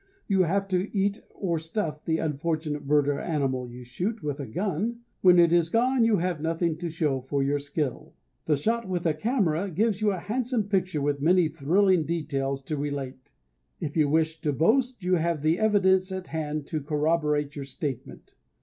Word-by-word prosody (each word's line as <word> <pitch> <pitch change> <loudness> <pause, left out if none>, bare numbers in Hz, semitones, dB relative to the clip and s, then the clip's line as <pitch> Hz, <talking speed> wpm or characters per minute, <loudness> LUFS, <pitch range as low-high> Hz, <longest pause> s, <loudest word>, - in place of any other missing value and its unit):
You 195 -2 +3
have 195 +4 0
to 185 +2 0
eat 200 +2 0
or 170 -5 -2
stuff 160 -2 -4
the 160 -1 +1
unfortunate 155 -1 -2
bird 145 -1 +3
or 145 -1 0
animal 135 -6 -1
you 125 +1 -10
shoot 190 - -4
with 145 -1 -3
a 140 - -5
gun. 200 - -2 0.2
When 180 -1 +7
it 170 -1 +5
is 170 -1 +3
gone 245 +4 +3
you 225 -2 +3
have 175 -3 -1
nothing 165 0 0
to 170 0 -4
show 150 -5 -1
for 135 +2 -1
your 145 +1 +1
skill. 145 -2 -4 0.3
The 150 -2 +2
shot 225 +7 -1
with 175 -2 -2
a 160 - +3
camera 195 - 0
gives 205 +4 0
you 215 - +3
a 195 - -1
handsome 240 +4 -1
picture 185 -7 0
with 145 -1 0
many 175 +1 +4
thrilling 170 +3 +2
details 140 -4 -2
to 155 +2 -3
relate. 140 -2 -5 0.5
If 145 - -4
you 150 -3 +3
wish 160 +1 +1
to 150 - 0
boast 235 - +1
you 180 0 +2
have 165 -2 -1
the 160 +3 +2
evidence 190 -3 +3
at 185 -1 -5
hand 155 -2 -3
to 155 0 -3
corroborate 150 0 0
your 140 -2 -5
statement. 135 -1 -6
160 Hz, 190 wpm, -27 LUFS, 145-190 Hz, 0.5 s, When